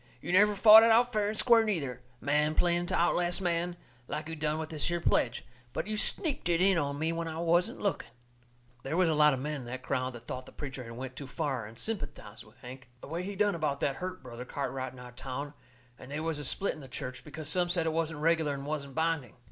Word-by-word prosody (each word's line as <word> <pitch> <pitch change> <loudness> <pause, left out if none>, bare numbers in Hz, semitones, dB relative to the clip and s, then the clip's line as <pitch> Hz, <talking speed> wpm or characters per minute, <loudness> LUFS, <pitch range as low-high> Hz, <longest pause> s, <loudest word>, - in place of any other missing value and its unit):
You - - -5
never 205 +3 +5
fought 215 +2 +10
it 230 - +5
out 240 +2 +4
fair 210 -1 +1
and 215 +1 -2
square, 235 -1 +6
neither, 160 - -2 0.2
man 150 +3 +1
playing 175 0 +2
to - - -1
outlast 175 +1 +1
man, 175 -1 -1 0.3
like 150 +2 -4
you 165 - -5
done 150 0 -1
with 160 0 -4
this 155 -2 -1
here 175 0 0
pledge, 120 -6 +1 0.3
but - - -2
you 215 +1 -3
sneaked 280 - 0
it 170 -1 +3
in 190 -1 +4
on 140 -2 -2
me 160 +2 0
when 165 0 -3
I 160 0 -5
wasn't 170 +1 +1
looking." 200 - -1 0.7
They 135 +5 -3
was 180 -1 +3
a - - +2
lot 150 -2 +5
of - - -5
men 150 +2 -3
in - - -9
that 130 +2 -6
crowd 130 0 -1
that 120 0 -11
thought 130 +1 -6
the - - -11
preacher 135 -2 -6
had 115 -1 -9
went 130 0 -6
too 140 +1 -7
far, 135 -6 -3
and 110 +1 -13
sympathized 145 - -4
with 110 0 -20
Hank. 125 0 -10
The - - -10
way 165 +3 -2
he 200 +2 -5
done 205 +1 +2
about 150 -4 -1
that 135 -1 0
hurt 185 -2 -5
Brother 120 -1 -7
Cartwright 130 -1 -4
in - - -14
our 125 0 -10
town, 135 +3 -6 0.5
and 130 - -11
they 145 - -3
was 160 -1 -2
a - - -4
split 195 +8 +1
in - - -11
the 135 - -10
church, 125 0 -6
because 150 0 -7
some 180 -1 +2
said 175 -2 +1
it 160 - 0
wasn't 160 -2 -1
reg'lar 160 -3 +2
and 140 0 -7
wasn't 140 -2 -4
binding. 160 -7 -1
155 Hz, 250 wpm, -30 LUFS, 135-175 Hz, 0.7 s, fought